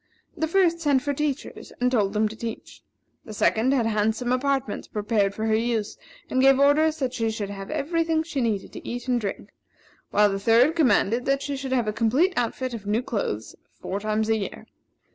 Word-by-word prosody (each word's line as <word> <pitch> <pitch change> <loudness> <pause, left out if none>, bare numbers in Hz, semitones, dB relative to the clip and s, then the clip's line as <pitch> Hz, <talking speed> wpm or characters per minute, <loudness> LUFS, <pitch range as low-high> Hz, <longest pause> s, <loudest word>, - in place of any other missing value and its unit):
The 320 - -1
first 340 -1 +2
sent 285 -5 +2
for 285 -1 -1
teachers, 290 -1 -4
and 250 0 +2
told 205 -5 +1
them 215 0 +2
to 215 - -8
teach 225 0 -7 0.4
her; - - -23
the - - -6
second 225 +5 +2
had 255 -4 +2
handsome 220 +2 0
apartments 265 -3 -1
prepared 205 -2 0
for 220 - -3
her 220 - +1
use, 225 -1 0 0.3
and 260 - +1
gave 270 0 +5
orders 305 +3 +4
that 260 -4 -2
she 225 -2 -1
should 210 -2 -4
have 195 -1 -7
every 330 +3 0
thing 320 -1 0
she 290 -4 -3
needed 215 -5 -2
to - - -8
eat 245 +1 -5
and 245 -2 +1
drink; 200 -2 -5 0.6
while 210 0 +3
the 195 - -2
third 235 +9 +4
commanded 250 -6 +2
that 275 0 +1
she 285 - -3
should 270 -1 -5
have 245 -4 +1
a 215 - 0
complete 250 - +2
outfit 250 +2 -2
of 210 -3 -7
new 220 +4 +1
clothes 110 - -3 0.2
four 195 - -4
times 215 +1 -1
a 225 0 +2
year. 200 - -6
240 Hz, 210 wpm, -25 LUFS, 215-275 Hz, 0.6 s, gave